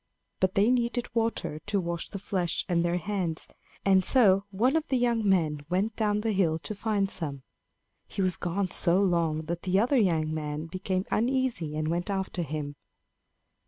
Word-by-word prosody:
But 190 Hz, 0 st, +1 dB
they 205 Hz, +5 st, +4 dB
needed 240 Hz, -1 st, -1 dB
water 225 Hz, -9 st, -1 dB
to 205 Hz, -1 st, +1 dB
wash 170 Hz, -2 st, -3 dB
the 200 Hz, -, -6 dB
flesh 185 Hz, -3 st, -1 dB
and 175 Hz, -2 st, +1 dB
their 175 Hz, +1 st, +1 dB
hands; 180 Hz, -3 st, -3 dB, 0.4 s
and 190 Hz, -1 st, +5 dB
so 195 Hz, -4 st, +5 dB
one 235 Hz, +9 st, +1 dB
of 320 Hz, -1 st, 0 dB
the 265 Hz, -, +1 dB
young 235 Hz, -4 st, +1 dB
men 155 Hz, -6 st, +1 dB
went 200 Hz, +5 st, 0 dB
down 210 Hz, -1 st, 0 dB
the 225 Hz, 0 st, 0 dB
hill 180 Hz, -6 st, +2 dB
to -, -, -4 dB
find 205 Hz, -2 st, -1 dB
some. 145 Hz, -7 st, -4 dB, 0.6 s
He 195 Hz, -, -2 dB
was 185 Hz, -1 st, +2 dB
gone 185 Hz, +1 st, -2 dB
so 175 Hz, 0 st, +3 dB
long 170 Hz, -5 st, +1 dB
that 170 Hz, +1 st, -4 dB
the 190 Hz, +1 st, +1 dB
other 250 Hz, +6 st, +2 dB
young 160 Hz, -8 st, +2 dB
man 150 Hz, 0 st, -4 dB
became 185 Hz, +2 st, -3 dB
uneasy 240 Hz, -, 0 dB
and 155 Hz, 0 st, -1 dB
went 175 Hz, +4 st, -1 dB
after 190 Hz, -2 st, -2 dB
him. 145 Hz, -2 st, -4 dB
190 Hz, 180 wpm, -28 LUFS, 170-210 Hz, 0.6 s, and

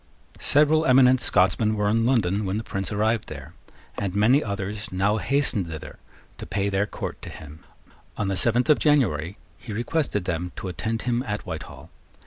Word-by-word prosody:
Several 150 Hz, +2 st, +4 dB
eminent 130 Hz, -1 st, +5 dB
Scotsmen 110 Hz, -1 st, +3 dB
were 105 Hz, -1 st, 0 dB
in 115 Hz, +2 st, +2 dB
London 105 Hz, -5 st, +1 dB
when 95 Hz, +1 st, -2 dB
the 110 Hz, -, -3 dB
Prince 95 Hz, -1 st, -4 dB
arrived 110 Hz, +1 st, 0 dB
there; -, -, -9 dB, 0.5 s
and 100 Hz, -2 st, -3 dB
many 120 Hz, +8 st, +4 dB
others 100 Hz, +1 st, -5 dB
now 100 Hz, +3 st, +1 dB
hastened 115 Hz, -4 st, 0 dB
thither 80 Hz, -2 st, -9 dB, 0.4 s
to -, -, -8 dB
pay 100 Hz, 0 st, -1 dB
their 100 Hz, +1 st, 0 dB
court -, -, -6 dB
to -, -, -8 dB
him. 75 Hz, 0 st, -12 dB, 0.5 s
On 105 Hz, -, -1 dB
the 95 Hz, -, -1 dB
seventh 120 Hz, +5 st, +2 dB
of 150 Hz, -, +4 dB
January 100 Hz, -, +1 dB, 0.2 s
he 115 Hz, -, -9 dB
requested 115 Hz, -, -1 dB
them 85 Hz, +1 st, -3 dB
to 95 Hz, -, -5 dB
attend 110 Hz, +6 st, -3 dB
him 120 Hz, 0 st, 0 dB
at 105 Hz, 0 st, -4 dB
Whitehall. -, -, -8 dB
105 Hz, 175 wpm, -24 LUFS, 95-120 Hz, 0.5 s, eminent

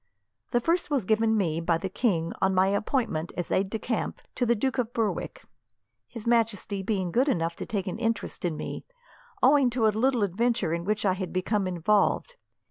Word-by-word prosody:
The 240 Hz, -, +2 dB
first 335 Hz, +7 st, 0 dB
was 275 Hz, -9 st, 0 dB
given 220 Hz, +1 st, +2 dB
me, 165 Hz, -5 st, 0 dB
by 165 Hz, 0 st, +2 dB
the 190 Hz, -, -3 dB
king, 185 Hz, -5 st, 0 dB
on 190 Hz, 0 st, +2 dB
my 185 Hz, +1 st, +5 dB
appointment 200 Hz, -, -1 dB
as 175 Hz, -, -3 dB
aide 190 Hz, 0 st, +1 dB
de 220 Hz, -, -2 dB
camp 230 Hz, +1 st, -3 dB
to 245 Hz, -, 0 dB
the 235 Hz, -, +4 dB
Duke 260 Hz, +4 st, -1 dB
of 240 Hz, -1 st, -1 dB
Berwick; 225 Hz, -2 st, -2 dB, 0.6 s
His 230 Hz, -3 st, -9 dB
Majesty 225 Hz, -4 st, +1 dB
being 190 Hz, -3 st, -1 dB
good 255 Hz, -, +2 dB
enough 165 Hz, -7 st, 0 dB
to -, -, -6 dB
take 200 Hz, -4 st, -2 dB
an 185 Hz, -, -4 dB
interest 225 Hz, -3 st, -2 dB
in 170 Hz, -4 st, -1 dB
me, -, -, -5 dB, 0.6 s
owing 270 Hz, 0 st, +6 dB
to 240 Hz, -2 st, 0 dB
a -, -, +6 dB
little 235 Hz, +2 st, +1 dB
adventure 200 Hz, -2 st, 0 dB
in 170 Hz, 0 st, -3 dB
which 210 Hz, +1 st, 0 dB
I 190 Hz, -, +4 dB
had 185 Hz, -1 st, -4 dB
become 190 Hz, +2 st, 0 dB
involved. 200 Hz, -, +1 dB
210 Hz, 200 wpm, -27 LUFS, 185-235 Hz, 0.6 s, owing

